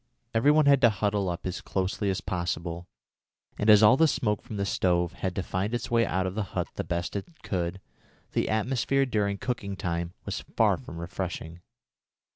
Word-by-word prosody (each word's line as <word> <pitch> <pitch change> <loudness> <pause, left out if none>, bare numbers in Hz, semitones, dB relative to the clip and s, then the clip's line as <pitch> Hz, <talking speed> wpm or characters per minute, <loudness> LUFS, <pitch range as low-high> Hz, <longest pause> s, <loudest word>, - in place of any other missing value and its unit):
Every 115 +5 +4
one 150 0 +5
had 140 -1 +5
to 120 - +7
huddle 100 -2 0
up 85 +1 -5
as 90 0 -3
closely 95 +2 -1
as 95 - -1
possible, 85 -1 -3 0.7
and 105 - +2
as 105 0 +8
all 120 +5 +7
the 160 - +5
smoke 110 -8 0
from 115 -4 -7
the 100 - 0
stove 90 -2 +1
had 95 -2 -3
to 95 - -1
find 100 +7 -2
its 120 - -4
way 115 -1 +3
out 95 0 0
of 95 - -2
the 110 - -1 0.2
hut - - -1
the - - -3
best 85 +2 -3
way 100 - 0
it 160 - -16
could, 90 -1 -2 0.5
the - - 0
atmosphere 130 +4 +1
during 105 -5 0
cooking 100 -4 -3
time 85 -1 -3
was - - -3 0.2
far - - +4
from 85 - -10
refreshing. 85 -1 -5
100 Hz, 200 wpm, -28 LUFS, 90-115 Hz, 0.7 s, as